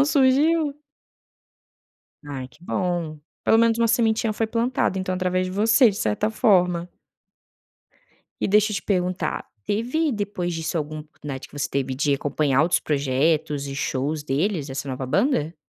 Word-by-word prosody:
Não - - +6
surgiu. 290 +2 +3 1.5
Ai, 135 -3 -6
que 150 +5 -24
bom, 175 -4 -2 0.2
pelo - - +4
menos 230 0 +3
uma 230 - +3
sementinha 225 -1 +2
foi 225 +1 -1
plantada 230 -3 0
então 185 0 -2
através 185 0 0
de 185 - -5
você 225 +5 +5
de 200 - -3
certa 110 - 0
forma. 180 -5 +2 1.5
E - - 0
deixa 210 +2 +3
eu - - -2
te - - -4
perguntar 180 -4 -1 0.2
teve 250 +10 0
depois 205 -6 -3
disso 165 +1 -3
algum 155 +1 -4
oportunidade 150 -3 -8
que - - -15
você 145 - -1
teve 135 -1 -2
de 145 +2 +1
acompanhar 140 0 +1
outros 170 +3 +2
projetos 145 +1 0
e 135 - -5
shows 140 +3 -2
deles, 150 +3 -1
dessa 140 0 -5
nova 130 0 -4
banda? 175 - +1
180 Hz, 155 wpm, -23 LUFS, 145-220 Hz, 1.5 s, Não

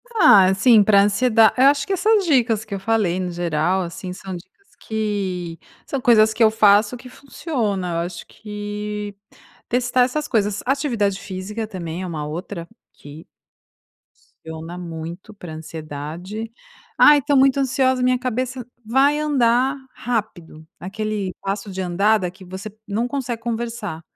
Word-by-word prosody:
Ah, 305 - +7
assim, 205 +4 +5
para 200 -1 +5
ansieda 220 +2 +4
eu 260 - +5
acho 280 +1 +4
que 390 - -2
essas 415 +1 +2
dicas 235 -8 +2
que 215 - -8
eu 195 - -3
falei 195 -3 0
no 180 -1 -3
geral, 175 +1 0
assim, 180 +1 -6
são 190 0 -7
dicas 185 - -15
que 195 -6 -3 0.3
são 275 - -3
coisas 220 -3 +5
que 230 - +2
eu 220 - +7
faço 210 +2 +4
que 250 +1 -12
funciona, 225 - -3
eu - - -1
acho 175 -1 -8
que 210 -1 -6 0.5
testar 245 +1 +1
essas 295 +4 -2
coisas, 210 -2 0
atividade 240 -8 0
física 210 +3 -5
também 175 -4 -6
é 185 - -4
uma 155 -4 -4
outra 170 +2 -6 0.3
que 145 +3 -13 1.2
funciona 160 +2 -8
muito 170 +3 -8
para 175 -5 -9
ansiedade. 160 +7 -7 0.5
"Ai 295 0 +7
estou 285 0 +1
muito 270 +1 +4
ansiosa 260 -1 +1
minha 255 0 +3
cabeça, 255 0 -3 0.2
vai 270 +6 +3
andar 265 -2 +2 0.2
rápido", 200 -9 -4
aquele 205 0 -4
passo 195 +1 -4
de 190 - -6
andar 195 +5 +2
daqui 185 0 -6
você 190 +3 -8
não 215 +4 -1
consegue 245 -4 -4
conversar, 230 -7 -4
210 Hz, 150 wpm, -21 LUFS, 185-245 Hz, 1.2 s, Ah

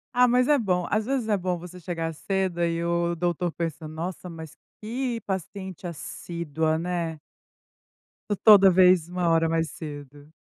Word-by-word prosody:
Ah, 250 0 +6
mas, 250 +1 +3
é 295 -1 +4
bom. 180 -5 0
Às 215 0 +1
vezes, 260 -4 -1
é 215 - +2
bom 180 -2 -1
você 180 +1 -10
chegar 165 -2 -3
cedo, 190 +1 -2
aí 170 0 0
o 170 0 0
doutor 175 0 -1
pensa: 165 -1 -4
"Nossa, 170 +3 -6
mas 160 -2 -9 0.2
que 240 +2 -3
paciente 190 -1 -5
assídua, 160 -1 -3
né". 170 -2 -3 1.1
T 205 - +2
toda 200 -3 +9
vez, 180 -2 +5
1 180 -1 0
hora 165 0 +3
mais 165 -1 0
cedo. 145 -1 -9
175 Hz, 160 wpm, -26 LUFS, 165-190 Hz, 1.1 s, toda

